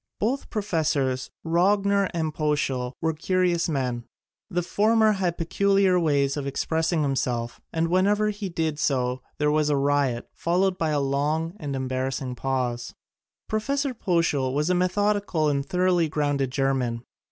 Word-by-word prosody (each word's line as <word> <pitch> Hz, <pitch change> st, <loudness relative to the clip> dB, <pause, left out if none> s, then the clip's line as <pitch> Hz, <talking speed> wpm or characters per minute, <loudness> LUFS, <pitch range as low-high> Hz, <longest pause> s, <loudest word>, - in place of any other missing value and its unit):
Both 250 Hz, +7 st, -1 dB
Professors 155 Hz, -, -1 dB, 0.2 s
Rogner 195 Hz, +3 st, +2 dB
and 160 Hz, -2 st, -2 dB
Poeschl 140 Hz, -5 st, -1 dB
were 160 Hz, 0 st, +1 dB
curious 175 Hz, +1 st, +1 dB
men. 125 Hz, -5 st, -2 dB, 0.4 s
The 175 Hz, -2 st, -1 dB
former 220 Hz, +4 st, +3 dB
had 185 Hz, -4 st, -1 dB
peculiar 195 Hz, +2 st, +2 dB
ways 140 Hz, -4 st, +1 dB
of 145 Hz, -2 st, -3 dB
expressing 160 Hz, +3 st, 0 dB
himself 120 Hz, -4 st, -2 dB
and 165 Hz, 0 st, 0 dB
whenever 205 Hz, +4 st, +2 dB
he 205 Hz, -2 st, -5 dB
did 160 Hz, -3 st, -2 dB
so 125 Hz, -3 st, 0 dB, 0.2 s
there 150 Hz, 0 st, +2 dB
was 150 Hz, 0 st, +2 dB
a 145 Hz, -, +2 dB
riot, 140 Hz, -3 st, +1 dB
followed 185 Hz, +2 st, 0 dB
by 160 Hz, -, +1 dB
a 150 Hz, -1 st, +1 dB
long 145 Hz, +4 st, 0 dB
and 145 Hz, -3 st, -4 dB
embarrassing 130 Hz, 0 st, -2 dB
pause. 125 Hz, -2 st, -2 dB, 0.5 s
Prof. 215 Hz, 0 st, -2 dB
Poeschl 175 Hz, -, 0 dB
was 150 Hz, +4 st, +1 dB
a -, -, +4 dB
methodical 185 Hz, -3 st, +1 dB
and 140 Hz, -1 st, 0 dB
thoroly 180 Hz, -2 st, +2 dB
grounded 145 Hz, -3 st, 0 dB
German. 130 Hz, -3 st, -1 dB
155 Hz, 140 wpm, -25 LUFS, 135-185 Hz, 0.5 s, a